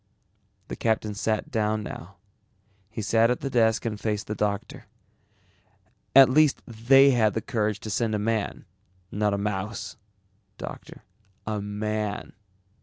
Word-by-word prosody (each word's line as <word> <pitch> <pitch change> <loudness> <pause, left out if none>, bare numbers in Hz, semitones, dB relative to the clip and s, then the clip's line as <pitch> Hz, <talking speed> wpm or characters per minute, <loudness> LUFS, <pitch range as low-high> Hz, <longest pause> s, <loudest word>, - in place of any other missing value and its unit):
The - - -5
captain 110 -2 0
sat 110 +1 -2
down 110 -2 0
now. 95 -1 -8 0.7
He 110 0 -5
sat 115 +2 +3
at 125 - -1
the 135 - -3
desk 115 -2 +2
and 105 -2 -3
faced 105 -2 -2
the 105 - -4
doctor. 100 -1 -3 1.3
"At 135 -1 +10
least 150 +2 +3
they 135 +5 +5
had 110 -5 +2
the - - +1
courage 105 -5 -1
to 110 - -6
send 110 +1 0
a - - +1
man, 110 0 -2 0.5
not 105 0 0
a - - -2
mouse. 105 +4 -4 0.6
Doctor, - - -9 0.4
a 110 -1 -2
man." 105 0 -3
110 Hz, 140 wpm, -26 LUFS, 105-115 Hz, 1.3 s, At